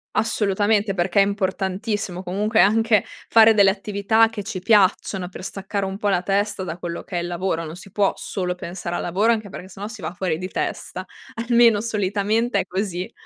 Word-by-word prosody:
Assolutamente, 210 -1 +1
perché 185 +2 +2
è - - +6
importantissimo 195 0 -2
comunque, 210 +5 +1
anche 220 0 +4 0.3
fare 225 0 +7
delle 200 -2 +6
attività 205 +2 +2
che 210 -3 -6
ci 200 -3 -5
piacciono, 195 -2 +2
per 185 0 -10
staccare 195 0 -4
un 190 0 -4
po' 205 - -2
la 180 -2 +2
testa 200 +1 -1
da 170 -2 -5
quello 170 -1 -5
che 180 - -5
è - - 0
il - - -4
lavoro. 175 -1 -2
Non 155 - -7
si 185 +2 -13
può 200 0 +2
solo 180 -2 -3
pensare 175 0 -6
al - - -2
lavoro, 200 +7 +2
anche 215 -3 -1
perché, 185 0 -9
se 190 - -13
no, 205 - -4
si 220 -3 -10
va - - -4
fuori 175 -3 -2
di 185 +1 -5
testa. 185 0 -4 0.4
Almeno 235 -3 +5
solitamente 210 +1 0
è 190 - -1
così. 185 -1 -3
195 Hz, 200 wpm, -22 LUFS, 185-215 Hz, 0.4 s, fare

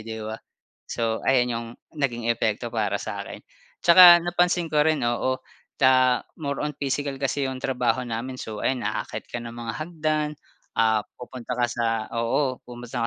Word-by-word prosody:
di 110 0 -7
ba? 110 +1 -6 0.5
So 115 -1 -1
ayon 125 -2 +4
yung 115 0 -4 0.3
naging 120 -5 -1
epekto 115 0 0
para 110 -2 0
sa'kin. - - -6 0.4
Tsaka 175 0 +9
napansin 175 0 +1
ko 150 -1 +3
rin 155 -1 +2
oo 120 +2 0 0.4
ta 130 -2 +5 0.2
more 140 -3 -3
on 150 -1 -3
physical 140 0 -2
kasi 135 0 -1
yung 130 - -4
trabaho 125 -1 0
namin, 120 +2 -4
so 110 -4 -6
ayan 130 -2 -1
aakyat - - -3
ka - - -3
ng 115 0 -7
mga 115 -1 -4
hagdan, 155 -2 -1 0.5
ah, 110 -1 +3 0.2
pupunta 125 -1 -7
ka 120 - +2
sa 120 -1 -1 0.3
oo 125 +3 0
pupunta 120 -1 -6
130 Hz, 160 wpm, -25 LUFS, 115-145 Hz, 0.5 s, Tsaka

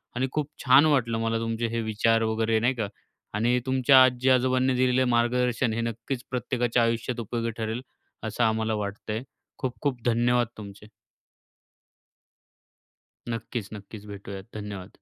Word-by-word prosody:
आणि 130 +2 0
खूप 150 -1 -2 0.2
छान 135 +4 +7
वाटलं 120 -7 +2
मला 115 0 0
तुमचे 115 0 -1
हे 115 0 -2
विचार 115 +1 +2
वगैरे 110 0 +1
नाही 125 +4 +2
का? 110 -4 -2 0.5
आणि 120 +4 +2
तुमच्या 130 0 +6
आजी-आजोबांनी 130 +1 +3
दिलेलं 130 0 +3
मार्गदर्शन 120 0 +1
हे 115 - -1
नक्कीच 115 +3 -4
प्रत्येकाच्या 120 -1 0
आयुष्यात 115 +1 -1
उपयोगी 115 +1 -2
ठरेल. 110 +2 -3 0.4
असं 110 +2 -1
आम्हाला 110 0 +1
वाटतंय. 105 +3 -4 0.4
खूप-खूप 130 0 -2
धन्यवाद 120 0 +2
तुमचे! 105 0 -10 2.4
नक्कीच, 115 -2 -4
नक्कीच 105 0 -10
भेटूयात. 100 -1 -8
धन्यवाद! 100 -2 -6
115 Hz, 130 wpm, -26 LUFS, 110-125 Hz, 2.4 s, छान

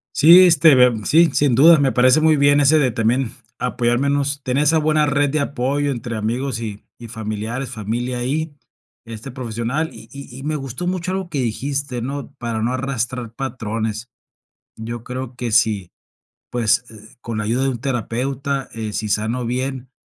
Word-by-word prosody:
Sí, 170 +5 +8
este, 160 -3 +6
de 125 -3 +4
sí, 165 +2 +5
sin 140 -4 +2
dudas 160 +5 +7
me 135 -2 +2
parece 130 +4 +4
muy 155 -1 +4
bien 145 +1 +4
ese 145 +2 +5
de 135 -5 +2
también 115 +2 0 0.3
apoyarnos, 140 +4 0
tener 130 +3 +1
esa 155 +2 +3
buena 155 -1 +2
red 145 0 +1
de 155 - 0
apoyo 140 +1 -1
entre 120 -2 -5
amigos 115 +3 -2
y 105 -2 -6 0.2
y 115 - -9
familiares, 110 +4 -4
familia 120 +3 -3
ahí, 145 +5 -2 0.5
este 115 +4 -8
profesional. 125 +5 -3
Y - - -13
y 140 -3 -10
y 135 - -9
me 155 +1 -2
gustó 135 +3 -5
mucho 185 0 -2
algo 190 -2 -3
que 145 - -3
dijiste, 130 +1 -3
¿no? 140 +2 -5
Para 115 -2 -3
no 120 +3 0
arrastrar 125 -3 -3
patrones. 115 -3 -4 0.7
Yo 115 +1 -6
creo 125 0 -6
que 120 -2 -4
sí, 105 -4 +1 0.6
pues, 120 0 +1
eh, 110 0 -16
con 115 -2 -4
la 105 - -2
ayuda 120 +5 0
de 135 - +1
un 125 -3 -4
terapeuta, 135 +2 -3
eh, 110 -2 -5
sí 105 0 -3
sano 115 +4 -1
bien, 130 +1 -3
130 Hz, 175 wpm, -20 LUFS, 115-140 Hz, 0.7 s, Sí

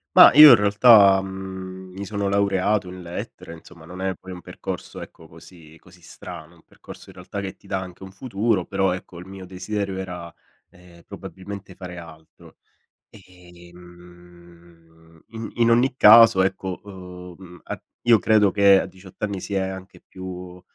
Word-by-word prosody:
Ma - - +9
io 150 +2 +10
in 125 - +9
realtà, 105 -1 +5
mhmm, 95 -1 -9
mi 100 - -6
sono 100 0 -3
laureato 100 0 0
in 90 0 -10
Lettere, 85 -1 -8
insomma 85 0 -15
non 90 +3 -10
è 95 -1 -2
poi 95 - -13
un 90 -1 -9
percorso - - -8
ecco 80 - -13
così 80 -1 -17
così 90 0 -21
strano; 80 -1 -11
è - - -21
un 85 - -24
percorso, - - -15
in - - -15
realtà, 90 +3 -8
che 95 -1 -7
ti - - -22
dà 95 - -2
anche 90 -1 -10
un 95 0 -10
futuro, 100 -2 -2
però 95 -1 0
ecco, 90 -2 -9
il 90 - -12
mio 95 -1 -10
desiderio 95 +1 -5
era, 90 -3 -7 0.4
ehm, 90 -1 -19
probabilmente 95 0 -10
fare 90 -1 -9
altro. 80 -2 -16 0.5
E, 90 -3 -18
mhmm, 85 -2 -19
in 115 0 -8
in 115 -1 +2
ogni 120 +2 +2
caso, 110 -4 +7
ecco, 95 -1 -3 0.6
uhm, 90 -2 -14
a - - -7 0.2
io 120 -1 +6
credo 105 -2 +3
che 100 -1 +5
a - - -5
18 95 0 -16
anni 100 -2 -3
si 100 - -7
è - - +1
anche 95 0 -7
più 90 -1 -10
95 Hz, 175 wpm, -22 LUFS, 90-100 Hz, 0.6 s, io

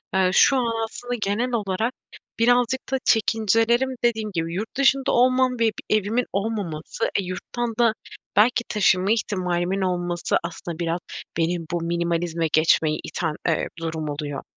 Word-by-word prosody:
eee, 190 -1 +4
şu 270 +7 +5
an 230 -2 0
aslında 245 +2 -5
genel 215 +5 0
olarak 220 +2 -1 0.5
birazcık 245 +2 +3
da 265 - +2
çekincelerim 225 +3 +2
dediğim 220 -3 +1
gibi 165 -1 -2
yurt 215 +6 -5
dışında 275 -1 +3
olmam 255 +1 +4
ve 230 - +3
bir 215 -1 0
evimin 215 +4 0
olmaması, 195 -4 -2
e, - - -1
yurttan 230 +6 -4
da 230 -2 +4 0.4
belki 235 +4 +4
taşıma 195 -2 +3
ihtimalimin 185 -3 0
olması 175 -2 0
aslında 170 0 -6
biraz 170 0 -1 0.4
beni 170 +1 +1
bu 175 -1 -1
minimalizme 170 -1 -1
geçmeye 155 -1 +3
iten, 160 -3 -3
eee, 165 -2 +1
durum 160 -2 -3
oluyor. 145 -1 -4
200 Hz, 145 wpm, -23 LUFS, 170-235 Hz, 0.5 s, şu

